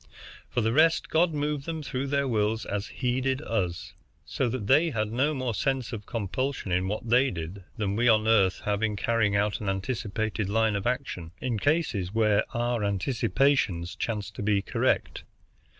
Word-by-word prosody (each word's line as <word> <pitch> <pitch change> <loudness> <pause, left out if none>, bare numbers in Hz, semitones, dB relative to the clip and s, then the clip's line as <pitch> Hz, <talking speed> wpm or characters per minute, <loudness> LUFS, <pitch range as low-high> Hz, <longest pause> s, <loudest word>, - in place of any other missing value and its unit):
For 120 - 0
the 110 +1 +1
rest, 160 +3 +3
God 165 +2 +3
moved 150 -1 -2
them 160 -2 -3
through 130 0 -3
their 140 0 +1
wills 110 -1 0
as 100 +1 -3
He 125 0 -1
did 130 0 0
us, 90 - -2 0.3
so 125 - -1
that 115 -3 -3
they 150 +9 +4
had 110 -6 -2
no 140 +6 +1
more 130 -3 -2
dense 130 +3 -1
of 105 -3 -6
compulsion 120 +1 -3
in 90 +1 +1
what 110 +4 -3
they 125 +4 +4
did 90 +1 -6
than 100 -2 -1
we 120 +3 +2
on 110 -1 +4
Earth 95 -5 +3
have 105 0 -1
in 110 -1 0
carrying 105 0 +1
out 105 +1 +1
an 100 - -2
anticipated 105 0 -2
line 110 0 +2
of 100 +2 -1
action, 120 -10 -3
in 120 -4 -2
cases 115 - 0
where 105 -2 +3
our 120 -1 -1
anticipations 100 -2 +1
chance 105 -3 -3
to - - -8
be 100 -1 +1
correct. - - 0
115 Hz, 180 wpm, -27 LUFS, 100-130 Hz, 0.3 s, they